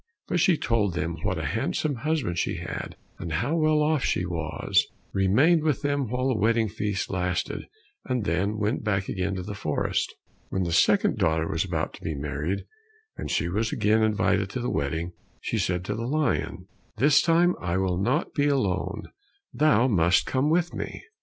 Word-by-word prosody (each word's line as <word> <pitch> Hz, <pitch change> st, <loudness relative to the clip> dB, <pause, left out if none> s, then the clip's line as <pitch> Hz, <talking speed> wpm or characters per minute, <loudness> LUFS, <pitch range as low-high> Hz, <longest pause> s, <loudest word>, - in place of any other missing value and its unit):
But -, -, 0 dB
she 180 Hz, -6 st, +4 dB
told 105 Hz, -9 st, 0 dB
them 85 Hz, -1 st, -2 dB
what -, -, -1 dB
a -, -, -3 dB
handsome 145 Hz, -4 st, -1 dB
husband 145 Hz, -, -1 dB
she -, -, -1 dB
had, -, -, -6 dB, 0.2 s
and 85 Hz, -, -4 dB
how 120 Hz, -, 0 dB
well 155 Hz, -2 st, +3 dB
off 150 Hz, -2 st, +1 dB
she 90 Hz, -, 0 dB
was, 80 Hz, -3 st, 0 dB, 0.3 s
remained 130 Hz, -, +4 dB
with 150 Hz, -2 st, 0 dB
them 145 Hz, -4 st, 0 dB
while 125 Hz, +2 st, 0 dB
the 125 Hz, -, +1 dB
wedding 115 Hz, +1 st, +3 dB
feast 105 Hz, -2 st, -2 dB
lasted, 90 Hz, -2 st, -2 dB, 0.4 s
and 125 Hz, -5 st, -1 dB
then 100 Hz, +5 st, 0 dB
went 105 Hz, +5 st, -1 dB
back 100 Hz, -3 st, 0 dB
again 95 Hz, +1 st, -1 dB
to 90 Hz, -, -4 dB
the 105 Hz, +3 st, -6 dB
forest. 75 Hz, -7 st, -1 dB, 0.4 s
When 95 Hz, -, -1 dB
the 85 Hz, -, -2 dB
second 80 Hz, -1 st, +3 dB
daughter 80 Hz, 0 st, +2 dB
was 80 Hz, -, 0 dB
about 85 Hz, -4 st, -2 dB
to -, -, -12 dB
be 80 Hz, -, -2 dB
married, 75 Hz, +6 st, -3 dB, 0.5 s
and -, -, -6 dB
she 85 Hz, -, 0 dB
was 110 Hz, +5 st, -1 dB
again 110 Hz, +2 st, +2 dB
invited 105 Hz, -2 st, +2 dB
to 125 Hz, -, -4 dB
the 120 Hz, -, -2 dB
wedding, 80 Hz, +5 st, -2 dB, 0.3 s
she -, -, -2 dB
said 90 Hz, 0 st, -1 dB
to -, -, -2 dB
the 115 Hz, +1 st, -3 dB
lion, 150 Hz, +2 st, -1 dB, 0.3 s
"This 145 Hz, +5 st, +5 dB
time 170 Hz, +2 st, +4 dB
I 90 Hz, 0 st, -1 dB
will 95 Hz, -1 st, 0 dB
not 130 Hz, +10 st, 0 dB
be 145 Hz, -1 st, +2 dB
alone, 100 Hz, -6 st, 0 dB, 0.5 s
thou 140 Hz, -5 st, +4 dB
must 90 Hz, -5 st, +3 dB
come 135 Hz, +3 st, +1 dB
with 175 Hz, +1 st, +1 dB
me." -, -, -5 dB
105 Hz, 185 wpm, -26 LUFS, 90-140 Hz, 0.5 s, This